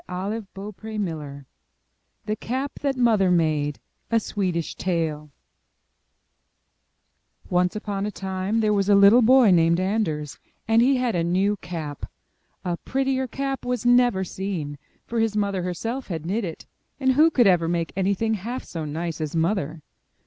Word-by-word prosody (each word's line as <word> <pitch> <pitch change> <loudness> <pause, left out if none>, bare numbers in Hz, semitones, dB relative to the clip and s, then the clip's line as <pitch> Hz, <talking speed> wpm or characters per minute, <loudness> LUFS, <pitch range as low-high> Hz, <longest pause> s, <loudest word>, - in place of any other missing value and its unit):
M 180 - -4 0.2
Y 225 - -2 0.2
BOOK 200 +1 -8
HOUSE 165 -10 -5 0.8
THE 215 0 -1
CAP 260 +6 -4
THAT 275 -2 -1
MOTHER 220 -6 +3
MADE 155 -4 +1 0.3
A 230 - +3
Swedish 185 -6 -2
Tale 160 -4 -2 2.2
Once 180 +1 +2
upon 205 -1 -3
a - - -1
time 190 +3 -2
there 215 -1 +2
was 200 -1 +1
a 205 - +6
little 200 +5 +7
boy, 245 -2 +6
named 170 0 +4
Anders, 185 -7 -1 0.3
and 225 +1 +4
he 265 +3 +4
had 250 -2 0
a 170 - 0
new 190 +4 +1
cap. 160 -6 -6 0.6
A 175 -1 -1
prettier 265 +2 -1
cap 270 +1 -3
was 245 -2 -2
never 245 -5 +4
seen, 175 -7 -4 0.3
for 235 - -2
his 225 -1 +1
mother 200 -2 0
herself 225 +9 -4
had 165 -4 -5
knit 210 +6 -1
it; 165 -3 -7 0.3
and 265 -1 +3
who 305 +5 +5
could 255 -7 +3
ever 175 -4 +4
make 170 -1 -1
anything 200 +4 +1
half 230 +5 -4
so 165 -2 -6
nice 160 +2 -4
as 155 0 -3
Mother! 165 -3 -1
195 Hz, 155 wpm, -24 LUFS, 170-225 Hz, 2.2 s, little